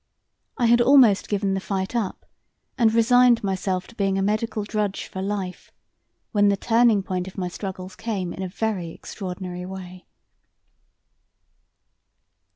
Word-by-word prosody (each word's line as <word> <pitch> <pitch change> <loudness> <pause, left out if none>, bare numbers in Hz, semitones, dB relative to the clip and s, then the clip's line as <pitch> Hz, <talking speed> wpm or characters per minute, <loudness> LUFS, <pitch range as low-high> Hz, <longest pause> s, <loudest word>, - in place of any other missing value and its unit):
I 240 - +2
had 235 +1 +5
almost 245 -6 +5
given 200 -1 0
the 190 - 0
fight 190 +2 -3
up 220 -5 -2 0.5
and 230 -3 +3
resigned 240 +1 +4
myself 190 -1 -1
to 235 - -16
being 195 -3 0
a 195 - +1
medical 215 +1 -1
drudge 205 -2 -2
for 190 - -6
life, 195 -2 -4 0.6
when 205 -2 +4
the 200 - +2
turning 225 -2 +3
point 185 -1 -3
of 190 - -10
my 180 -2 -2
struggles 185 0 -7
came 195 -4 -3
in - - -7
a 190 - -3
very 195 -3 -2
extraordinary 180 0 -7
way. 185 -1 -9
195 Hz, 145 wpm, -24 LUFS, 185-225 Hz, 0.6 s, had